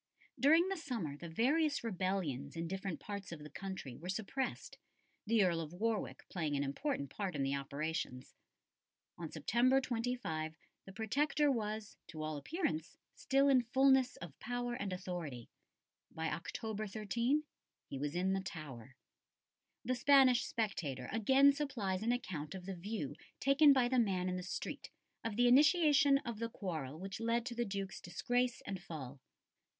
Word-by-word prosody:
During 320 Hz, +6 st, +6 dB
the 390 Hz, 0 st, -1 dB
summer 230 Hz, -, -3 dB
the 170 Hz, +3 st, -8 dB
various 285 Hz, -, +2 dB
rebellions 185 Hz, -, -2 dB
in 165 Hz, 0 st, -3 dB
different 190 Hz, 0 st, -3 dB
parts 200 Hz, -3 st, -6 dB
of 170 Hz, -, -5 dB
the 150 Hz, -, -10 dB
country 190 Hz, -9 st, -6 dB
were 175 Hz, +7 st, -8 dB
suppressed, 220 Hz, +7 st, -3 dB, 0.5 s
the 225 Hz, -1 st, +4 dB
Earl 170 Hz, -3 st, +2 dB
of 160 Hz, +1 st, -7 dB
Warwick 220 Hz, +3 st, -2 dB
playing 155 Hz, -5 st, -2 dB
an 140 Hz, -, +1 dB
important 140 Hz, -, -2 dB
part 195 Hz, -5 st, -3 dB
in 140 Hz, -, 0 dB
the 135 Hz, 0 st, 0 dB
operations. 140 Hz, -1 st, -3 dB, 0.9 s
On 165 Hz, -2 st, -4 dB
September 240 Hz, -, +3 dB
25 230 Hz, -11 st, -2 dB, 0.3 s
the 195 Hz, -, -9 dB
Protector 285 Hz, +8 st, +1 dB
was, 215 Hz, -3 st, -3 dB
to 155 Hz, -1 st, -6 dB
all 155 Hz, 0 st, -2 dB
appearance, 170 Hz, -, -2 dB, 0.2 s
still 275 Hz, +1 st, +2 dB
in 265 Hz, -2 st, +6 dB
fulness 265 Hz, +1 st, +4 dB
of 165 Hz, -5 st, -10 dB
power 245 Hz, 0 st, -2 dB
and 200 Hz, -4 st, -3 dB
authority. 175 Hz, -10 st, -5 dB, 0.6 s
By 160 Hz, 0 st, -3 dB
October 215 Hz, +6 st, -4 dB
13 235 Hz, +8 st, 0 dB, 0.4 s
he 135 Hz, -, -5 dB
was 145 Hz, +3 st, -2 dB
in 185 Hz, +2 st, +1 dB
the 195 Hz, -, 0 dB
Tower. 135 Hz, -, -8 dB, 0.9 s
The 255 Hz, -, +1 dB
Spanish 255 Hz, -1 st, +5 dB
spectator 155 Hz, -, -2 dB
again 265 Hz, +6 st, +5 dB
supplies 230 Hz, -10 st, -2 dB
an 230 Hz, +2 st, +1 dB
account 175 Hz, -10 st, -3 dB
of 185 Hz, -1 st, -8 dB
the 195 Hz, -, -4 dB
view 175 Hz, -5 st, -4 dB, 0.3 s
taken 280 Hz, +2 st, +6 dB
by 260 Hz, -3 st, +4 dB
the 255 Hz, 0 st, +2 dB
man 185 Hz, -5 st, +1 dB
in 180 Hz, -, -1 dB
the 180 Hz, -, -3 dB
street 180 Hz, -, -5 dB, 0.3 s
of 225 Hz, -2 st, -2 dB
the 245 Hz, +2 st, +4 dB
initiation 290 Hz, +1 st, +6 dB
of 235 Hz, -3 st, -4 dB
the 230 Hz, 0 st, -2 dB
quarrel 155 Hz, -, -4 dB
which 195 Hz, +2 st, -5 dB
led 230 Hz, +1 st, +1 dB
to 245 Hz, -, -3 dB
the 240 Hz, 0 st, -1 dB
Duke's 195 Hz, -2 st, -4 dB
disgrace 245 Hz, +6 st, 0 dB
and 195 Hz, -3 st, -4 dB
fall. 145 Hz, -6 st, -7 dB
200 Hz, 160 wpm, -36 LUFS, 165-245 Hz, 0.9 s, During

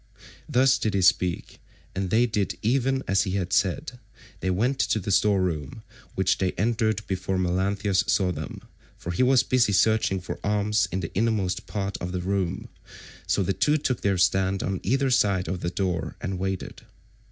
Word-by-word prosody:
Thus 130 Hz, -1 st, +4 dB
did 110 Hz, -2 st, -1 dB
he 95 Hz, -, +1 dB
speak, 90 Hz, -1 st, +1 dB, 0.3 s
and 95 Hz, -1 st, -2 dB
they 115 Hz, +5 st, +4 dB
did 100 Hz, -6 st, -2 dB
even 130 Hz, +3 st, +1 dB
as 95 Hz, 0 st, +3 dB
he 95 Hz, -, -2 dB
had 90 Hz, -2 st, -2 dB
said; 125 Hz, -, 0 dB, 0.4 s
they 95 Hz, -, -2 dB
went 120 Hz, +9 st, 0 dB
to -, -, +1 dB
the 100 Hz, +1 st, -4 dB
store 100 Hz, +1 st, +3 dB
room, 75 Hz, -6 st, -4 dB, 0.3 s
which 95 Hz, 0 st, +1 dB
they 95 Hz, -1 st, 0 dB
entered 110 Hz, 0 st, 0 dB
before 95 Hz, 0 st, -2 dB
Melanthius 95 Hz, +2 st, +1 dB
saw 95 Hz, -2 st, +2 dB
them, 80 Hz, -2 st, -6 dB, 0.4 s
for 85 Hz, -, -5 dB
he 85 Hz, -, -1 dB
was 130 Hz, 0 st, +4 dB
busy 125 Hz, -5 st, +2 dB
searching 110 Hz, -1 st, +2 dB
for 90 Hz, -, -7 dB
arms 105 Hz, 0 st, +1 dB
in 95 Hz, -, -2 dB
the 85 Hz, -, -6 dB
innermost 105 Hz, -3 st, 0 dB
part 100 Hz, -2 st, -3 dB
of 90 Hz, +1 st, -5 dB
the 90 Hz, -, -2 dB
room, 95 Hz, -1 st, -2 dB, 0.6 s
so 100 Hz, -, +1 dB
the 95 Hz, -, 0 dB
two 150 Hz, -, +2 dB
took 130 Hz, -4 st, -2 dB
their 100 Hz, -2 st, +1 dB
stand 95 Hz, +2 st, +2 dB
on 95 Hz, 0 st, -2 dB
either 135 Hz, +4 st, +1 dB
side 100 Hz, -7 st, +2 dB
of 90 Hz, +2 st, -3 dB
the 85 Hz, -, -1 dB
door 90 Hz, -2 st, -2 dB
and 95 Hz, 0 st, -4 dB
waited. 95 Hz, 0 st, -4 dB
95 Hz, 185 wpm, -25 LUFS, 90-110 Hz, 0.6 s, Thus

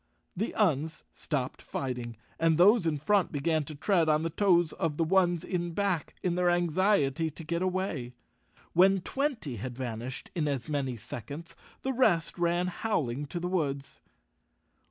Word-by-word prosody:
The 210 Hz, +6 st, -2 dB
Uns 160 Hz, -6 st, +1 dB
stopped 135 Hz, -4 st, -3 dB
fighting, 120 Hz, -4 st, -4 dB, 0.2 s
and 165 Hz, -1 st, +3 dB
those 195 Hz, +1 st, +6 dB
in 155 Hz, -2 st, +1 dB
front 195 Hz, +5 st, +2 dB
began 155 Hz, +1 st, 0 dB
to 155 Hz, -, -7 dB
tread 170 Hz, +1 st, +2 dB
on 155 Hz, +1 st, +3 dB
the 165 Hz, -, -1 dB
toes 175 Hz, -3 st, +3 dB
of 155 Hz, -3 st, -2 dB
the 165 Hz, -, +2 dB
ones 175 Hz, 0 st, +2 dB
in 175 Hz, -2 st, -2 dB
back, 195 Hz, -6 st, -1 dB
in 180 Hz, -, +1 dB
their 180 Hz, 0 st, +2 dB
anxiety 175 Hz, -3 st, +2 dB
to 155 Hz, +2 st, -10 dB
get 170 Hz, +2 st, -2 dB
away. 185 Hz, -9 st, -2 dB, 0.6 s
When 190 Hz, +2 st, +5 dB
twenty 245 Hz, -, -2 dB
had 125 Hz, +4 st, -5 dB
van¬ 120 Hz, -4 st, -4 dB
ished 130 Hz, +1 st, -6 dB
in 160 Hz, -4 st, 0 dB
as 135 Hz, -5 st, -2 dB
many 135 Hz, -5 st, -2 dB
seconds, 145 Hz, +10 st, -8 dB, 0.3 s
the 265 Hz, -, 0 dB
rest 185 Hz, -11 st, +2 dB
ran 175 Hz, +1 st, +2 dB
howling 150 Hz, -, -2 dB
to 175 Hz, -, -4 dB
the 175 Hz, -, -2 dB
woods. 140 Hz, -7 st, -2 dB
165 Hz, 165 wpm, -29 LUFS, 140-180 Hz, 0.6 s, those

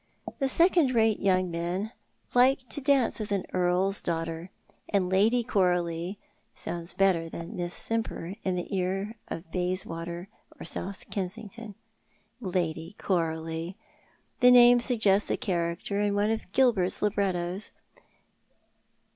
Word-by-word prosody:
The 270 Hz, -1 st, +1 dB
second 330 Hz, -4 st, +4 dB
rato 220 Hz, -2 st, +3 dB
yoimg 185 Hz, -2 st, +2 dB
men 175 Hz, +6 st, -2 dB, 0.4 s
like 255 Hz, +1 st, +4 dB
to 290 Hz, -, -3 dB
dance 270 Hz, -4 st, +2 dB
with 210 Hz, -1 st, -5 dB
an 200 Hz, -2 st, 0 dB
earl's 185 Hz, +2 st, +2 dB
daughter, 165 Hz, +1 st, -3 dB, 0.4 s
and 185 Hz, -3 st, +1 dB
Lady 220 Hz, +6 st, +4 dB
Coralie 180 Hz, -4 st, 0 dB, 0.4 s
sounds 170 Hz, 0 st, -5 dB
better 180 Hz, -4 st, +2 dB
than 170 Hz, +1 st, -7 dB
Miss 175 Hz, 0 st, -3 dB
Simper 225 Hz, -6 st, -2 dB
in 185 Hz, -1 st, 0 dB
the 180 Hz, +2 st, -3 dB
ear 195 Hz, +4 st, -2 dB
of 165 Hz, 0 st, -7 dB
Bayswater 175 Hz, -1 st, -2 dB, 0.3 s
or -, -, -7 dB
South 190 Hz, +3 st, -3 dB
Kensington. 210 Hz, +2 st, -5 dB, 0.6 s
Lady 175 Hz, -3 st, -2 dB
Coralie! 165 Hz, -1 st, -2 dB, 0.6 s
The 250 Hz, -, +7 dB
name 245 Hz, 0 st, +8 dB
suggests 220 Hz, -5 st, +2 dB
a -, -, +1 dB
character 180 Hz, -1 st, -2 dB
in 205 Hz, -1 st, +1 dB
one 205 Hz, +2 st, +2 dB
of 220 Hz, -4 st, -4 dB
Gilbert's 215 Hz, -9 st, +2 dB
librettos. 195 Hz, -2 st, -1 dB
190 Hz, 125 wpm, -28 LUFS, 175-220 Hz, 0.6 s, name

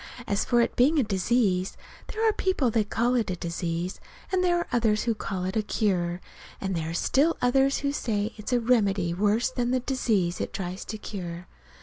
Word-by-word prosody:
"As 200 Hz, 0 st, 0 dB
for 240 Hz, -1 st, +3 dB
it's 235 Hz, -, +1 dB
being 285 Hz, +6 st, +4 dB
a 280 Hz, -, +4 dB
disease 195 Hz, -2 st, +1 dB, 0.3 s
there 445 Hz, +1 st, 0 dB
are 435 Hz, -, +4 dB
people 340 Hz, -, +1 dB
that 215 Hz, -2 st, 0 dB
call 240 Hz, +2 st, +1 dB
it 235 Hz, -5 st, +1 dB
a 185 Hz, -, -1 dB
disease, 170 Hz, +1 st, -3 dB, 0.3 s
and 370 Hz, -1 st, +2 dB
there 350 Hz, -1 st, +3 dB
are 345 Hz, -, -2 dB
others 220 Hz, -3 st, +2 dB
who 235 Hz, -, +1 dB
call 195 Hz, -3 st, -4 dB
it 190 Hz, +3 st, -3 dB
a 220 Hz, -, +3 dB
cure; 180 Hz, -5 st, 0 dB, 0.4 s
and 195 Hz, -1 st, -2 dB
there 160 Hz, -1 st, -2 dB
are -, -, -4 dB
still 290 Hz, -, +2 dB
others 270 Hz, +2 st, +2 dB
who 280 Hz, 0 st, 0 dB
say 220 Hz, -5 st, -1 dB
it's 210 Hz, +2 st, -6 dB
a 245 Hz, -, +3 dB
remedy 205 Hz, -7 st, +2 dB
worse 210 Hz, +7 st, +1 dB
than 245 Hz, -2 st, -1 dB
the 255 Hz, +1 st, +2 dB
disease 220 Hz, -9 st, 0 dB
it -, -, -4 dB
tries 185 Hz, 0 st, -4 dB
to 215 Hz, -, -5 dB
cure. 180 Hz, -4 st, -6 dB
215 Hz, 210 wpm, -27 LUFS, 185-250 Hz, 0.4 s, being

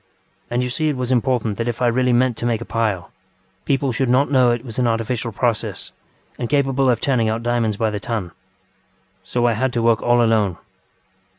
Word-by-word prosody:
And 120 Hz, +1 st, 0 dB
you 125 Hz, -, -3 dB
see 155 Hz, +4 st, 0 dB
it 145 Hz, -, -2 dB
was 125 Hz, 0 st, -2 dB
important 120 Hz, -4 st, 0 dB
that 115 Hz, -, -1 dB
if 120 Hz, -1 st, -3 dB
I 125 Hz, -, +1 dB
really 125 Hz, +1 st, +2 dB
meant 125 Hz, 0 st, +2 dB
to -, -, -4 dB
make 115 Hz, -2 st, 0 dB
a 115 Hz, -, -7 dB
pile, 105 Hz, -6 st, -2 dB, 0.5 s
people 135 Hz, -1 st, +1 dB
should 125 Hz, +2 st, -1 dB
not 135 Hz, +4 st, +3 dB
know 130 Hz, -3 st, +4 dB
it 120 Hz, +1 st, -1 dB
was 115 Hz, -1 st, -6 dB
an 125 Hz, -, +2 dB
artificial 115 Hz, +1 st, -1 dB
process 110 Hz, -2 st, -2 dB, 0.5 s
and 120 Hz, -, -3 dB
capable 135 Hz, -2 st, +2 dB
of 120 Hz, -, +2 dB
turning 120 Hz, -5 st, +1 dB
out 110 Hz, +1 st, -2 dB
diamonds 115 Hz, -3 st, 0 dB
by 110 Hz, 0 st, 0 dB
the 105 Hz, -, -3 dB
ton. 105 Hz, -5 st, -4 dB, 0.9 s
So 120 Hz, +5 st, -1 dB
I 120 Hz, -, +3 dB
had 130 Hz, +4 st, 0 dB
to 120 Hz, -, 0 dB
work 115 Hz, -1 st, +3 dB
all 120 Hz, 0 st, +3 dB
alone. 110 Hz, -6 st, +2 dB
120 Hz, 210 wpm, -20 LUFS, 115-125 Hz, 0.9 s, know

